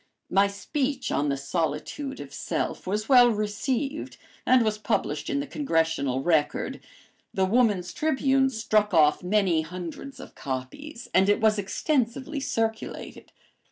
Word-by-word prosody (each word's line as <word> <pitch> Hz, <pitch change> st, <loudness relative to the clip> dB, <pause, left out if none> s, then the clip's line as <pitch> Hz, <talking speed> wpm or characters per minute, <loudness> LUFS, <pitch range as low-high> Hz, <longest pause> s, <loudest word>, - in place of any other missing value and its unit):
My 195 Hz, +1 st, +4 dB
speech 265 Hz, +7 st, -2 dB
on 145 Hz, +1 st, +1 dB
the 140 Hz, -, 0 dB
"Solitude 165 Hz, -, -3 dB
of -, -, -9 dB
Self" -, -, -3 dB
was 210 Hz, +3 st, -1 dB
well 245 Hz, -2 st, +7 dB
received 235 Hz, +7 st, -2 dB, 0.3 s
and 255 Hz, -1 st, +5 dB
was 215 Hz, -1 st, -1 dB
published -, -, -1 dB
in 280 Hz, -1 st, 0 dB
the -, -, -4 dB
Congressional 160 Hz, -, 0 dB
Record. 155 Hz, -3 st, 0 dB, 0.6 s
The 190 Hz, -, +3 dB
Woman's 200 Hz, -4 st, +2 dB
Tribune 270 Hz, -3 st, +2 dB
struck 215 Hz, -4 st, +1 dB
off 150 Hz, -2 st, +5 dB
many 180 Hz, -3 st, +2 dB
hundreds 180 Hz, -, -7 dB
of -, -, -11 dB
copies 140 Hz, -, -6 dB
and 190 Hz, +1 st, +4 dB
it 205 Hz, -, +3 dB
was 215 Hz, -1 st, +3 dB
extensively 265 Hz, +6 st, -1 dB
circulated. 225 Hz, -4 st, -3 dB
210 Hz, 135 wpm, -26 LUFS, 175-265 Hz, 0.6 s, well